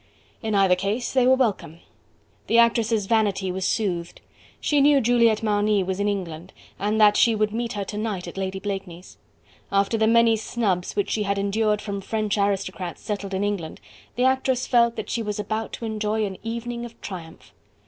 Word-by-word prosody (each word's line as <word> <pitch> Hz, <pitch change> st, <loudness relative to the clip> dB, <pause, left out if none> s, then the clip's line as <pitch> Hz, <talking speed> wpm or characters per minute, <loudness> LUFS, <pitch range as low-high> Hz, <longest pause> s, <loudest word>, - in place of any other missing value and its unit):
In 220 Hz, -2 st, -1 dB
either 195 Hz, -2 st, +4 dB
case 200 Hz, +6 st, -2 dB
they 255 Hz, -2 st, +4 dB
were 260 Hz, -, +6 dB
welcome. 190 Hz, -, -1 dB, 0.7 s
The 230 Hz, -, +3 dB
actress' 230 Hz, -2 st, +3 dB
vanity 200 Hz, -3 st, +1 dB
was 190 Hz, +1 st, -2 dB
soothed. 175 Hz, -6 st, -2 dB, 0.4 s
She 290 Hz, -2 st, +2 dB
knew 285 Hz, 0 st, +5 dB
Juliette 230 Hz, -3 st, +3 dB
Marny 210 Hz, -1 st, +2 dB
was 190 Hz, +1 st, -3 dB
in 205 Hz, -, +1 dB
England, 180 Hz, -3 st, -4 dB, 0.3 s
and 210 Hz, +2 st, 0 dB
that 210 Hz, -1 st, +6 dB
she 230 Hz, +1 st, +4 dB
would 215 Hz, 0 st, 0 dB
meet 235 Hz, 0 st, -2 dB
her 205 Hz, -, -3 dB
to 205 Hz, +2 st, -5 dB
night 210 Hz, -5 st, -3 dB
at -, -, -8 dB
Lady 190 Hz, 0 st, -3 dB
Blakeney's. 190 Hz, -3 st, -6 dB, 0.5 s
After 200 Hz, +3 st, +1 dB
the 220 Hz, -, +3 dB
many 230 Hz, 0 st, +5 dB
snubs 205 Hz, -5 st, -2 dB
which 205 Hz, -, -1 dB
she 215 Hz, -, 0 dB
had 200 Hz, -1 st, 0 dB
endured 210 Hz, +1 st, +1 dB
from 200 Hz, -2 st, -4 dB
French 215 Hz, +1 st, -1 dB
aristocrats 195 Hz, -3 st, -2 dB
settled 200 Hz, -2 st, -4 dB
in 190 Hz, -, -1 dB
England, 200 Hz, -6 st, -3 dB, 0.4 s
the 250 Hz, -, 0 dB
actress 260 Hz, -1 st, +1 dB
felt 235 Hz, -1 st, +3 dB
that -, -, -5 dB
she 235 Hz, -, -1 dB
was 210 Hz, -2 st, -3 dB
about 215 Hz, +2 st, -3 dB
to 230 Hz, -, -5 dB
enjoy 215 Hz, 0 st, -1 dB
an 190 Hz, -2 st, -6 dB
evening 235 Hz, +1 st, -4 dB
of 235 Hz, -1 st, -10 dB
triumph. 170 Hz, -4 st, -9 dB
210 Hz, 190 wpm, -24 LUFS, 195-230 Hz, 0.7 s, were